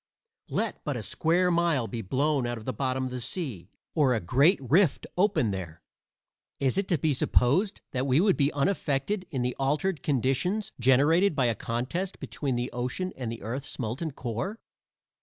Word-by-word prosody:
Let - - -2
but - - -2
a - - -5
square 180 +2 +2
mile 170 -7 +2
be 115 -1 -4
blown 135 +5 0
out 120 0 -3
of 110 - -10
the 130 - -2
bottom 130 -1 -1
of 130 - -4
the 125 -1 -4
sea, 120 - -4 0.2
or 140 -6 +3
a - - +1
great 140 - +3
rift 150 - +2
open 180 - +2
there. 85 -4 -6 0.8
Is 135 +6 +1
it 195 - -2
to 175 - +2
be 150 +1 +1
supposed 145 - +2
that 130 +1 -1
we 135 +2 +4
would 195 +1 +4
be 140 0 +2
unaffected 160 +4 0
in 130 -6 -2
the 125 0 -1
altered 145 +4 0
conditions 150 - 0
generated 145 +9 +4
by 135 -3 +2
a 120 - +2
contest 125 - -3
between 135 -4 -3
the 120 +1 -2
ocean 125 +10 -3
and 125 -4 -4
the 115 - -7
earth's 130 +6 -5
molten 125 +7 -3
core? 130 - -4
135 Hz, 180 wpm, -28 LUFS, 125-170 Hz, 0.8 s, we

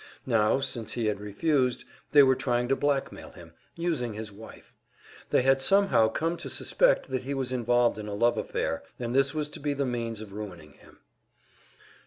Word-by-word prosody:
Now, 115 0 +2
since 120 -5 -3
he 120 -2 -2
had 105 -2 0
refused, 125 +5 0 0.3
they 145 -1 +8
were 130 -1 +5
trying 125 -2 0
to 135 - +3
blackmail 140 -1 -2
him, - - -14 0.2
using 150 -10 -2
his 110 0 -6
wife. 110 +3 -14 0.6
They - - +3
had 135 0 +3
somehow 195 - +4
come 165 +9 -2
to 170 - -7
suspect - - +1
that 130 - -1
he 140 +2 -4
was 130 -2 -2
involved 120 -2 +2
in 105 - -6
a 105 - -4
love 120 +3 +3
affair, 80 - -2 0.2
and 120 -1 -4
this 135 +2 +2
was 150 -1 -1
to - - -9
be 145 0 -2
the 140 0 -1
means 115 -3 -3
of 105 -2 -10
ruining 90 -8 -8
him. - - -20
125 Hz, 190 wpm, -28 LUFS, 110-140 Hz, 0.6 s, they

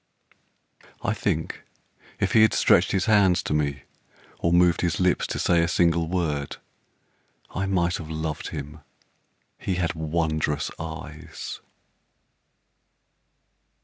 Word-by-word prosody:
I - - +1
think - - -2 0.6
if - - +1
he 110 - +6
had 110 - +5
stretched - - +4
his 95 -1 +1
hands 100 -5 +4
to - - -2
me, 70 -2 -1 0.6
Or 85 - +1
moved 85 -1 +4
his 85 -2 0
lips 90 -1 +2
to - - -3
say 85 -1 +3
a 85 - +2
single 85 -1 +2
word, 80 -5 -2 0.9
I 95 +2 -2
might 90 -2 +1
have 80 -2 -8
loved 80 -1 -3
him 75 0 -7 0.8
he 95 - -2
had 85 -1 0
wondrous 80 -2 -1
eyes. 80 0 -7
85 Hz, 120 wpm, -25 LUFS, 80-90 Hz, 0.9 s, he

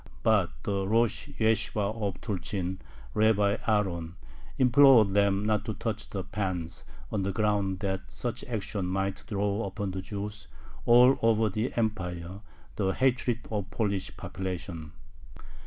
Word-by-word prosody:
But 105 -6 +4
the 100 -1 -1
Rosh 115 +3 +1
Yeshibah 110 -1 +1
of 100 -3 -2
Tulchyn, 95 -2 -3 0.3
Rabbi 105 -1 +3
Aaron, 90 -6 0 0.4
implored 125 -5 +6
them 100 0 +3
not 105 -1 +1
to 110 - -3
touch 110 -2 -4
the 95 -2 -4
pans, 90 -4 -4 0.3
on 105 - 0
the 95 +1 -1
ground 100 -2 0
that 95 -1 -2
such 120 0 -4
action 105 -5 -3
might 95 +1 -2
draw 100 +1 -1
upon 100 0 -3
the 95 0 -4
Jews 100 +1 -6 0.4
all 125 +3 +7
over 110 -1 +3
the 110 +6 -2
Empire 95 -5 -2 0.4
the 95 -2 +1
hatred 125 -2 +1
of 100 -3 -2
the - - -16
Polish 100 -4 -1
population. 90 -4 -5
100 Hz, 140 wpm, -29 LUFS, 95-110 Hz, 0.4 s, all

